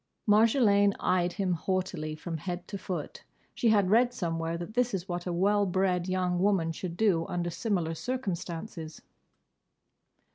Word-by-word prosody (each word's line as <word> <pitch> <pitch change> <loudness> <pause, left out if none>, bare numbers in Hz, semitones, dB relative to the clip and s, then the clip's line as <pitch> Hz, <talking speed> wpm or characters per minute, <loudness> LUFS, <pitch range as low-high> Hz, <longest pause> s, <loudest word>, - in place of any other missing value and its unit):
Marjolaine 210 -2 +4
eyed 180 -1 +1
him 190 -4 0
haughtily 170 -3 -2
from 165 +1 -5
head 175 +3 -5
to 205 - -6
foot. 175 -5 -5 0.3
She 235 - +2
had 200 -3 +3
read 245 +2 +4
somewhere 165 -3 -2
that 175 +5 -7
this 245 -2 +1
is 185 0 -5
what 175 -1 -4
a - - -1
well 200 +3 +2
bred 185 -1 0
young 180 -1 0
woman 185 -4 +2
should 170 +1 -6
do 185 -7 +2
under 175 -1 -2
similar 170 -2 -1
circumstances. 170 -6 -5
185 Hz, 150 wpm, -29 LUFS, 170-205 Hz, 0.3 s, Marjolaine